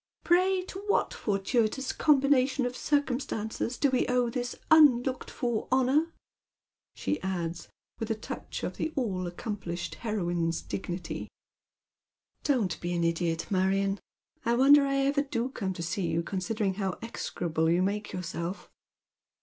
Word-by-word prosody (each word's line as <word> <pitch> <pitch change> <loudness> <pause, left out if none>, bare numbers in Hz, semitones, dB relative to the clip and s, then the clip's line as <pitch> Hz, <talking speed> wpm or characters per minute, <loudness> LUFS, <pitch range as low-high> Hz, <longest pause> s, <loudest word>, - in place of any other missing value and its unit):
Pray 365 +2 +3
to 380 +1 -8
what 410 - +2
fortuitous 220 +5 0
combination 275 -3 +3
of 245 0 -3
circumstances 250 -5 -1
do 280 - +2
we 255 - +2
owe 250 -1 +2
this 245 0 -3 0.2
unlooked 265 -5 +5
for 240 -3 -2
honour? 265 +6 +3 0.4
" - - -62
she 300 - -2
adds, 175 -3 -3 0.3
with 225 -1 -3
a 225 - +1
touch 215 - -6
of - - -3
the 315 - -1
all 190 -9 -1
accomplished 175 -1 -4
heroine's 175 -7 -1
dignity. 180 -1 -5 0.6
" - - -53
Don't 240 - +1
be 175 0 -2
an 170 -1 0
idiot, 165 0 0
Marion. 195 +1 +2 0.4
I 235 +1 +2
wonder 280 +3 +7
I 275 - 0
ever 280 +1 +2
do 255 -3 -2
come 195 -7 -3
to 170 - -5
see 175 +2 -1
you, 165 +1 0
considering 195 +3 -1
how 190 -2 -1
execrable 165 -7 -1
you 175 +2 +3
make 205 +2 -2
yourself." 180 +1 -5
220 Hz, 145 wpm, -29 LUFS, 180-265 Hz, 0.6 s, wonder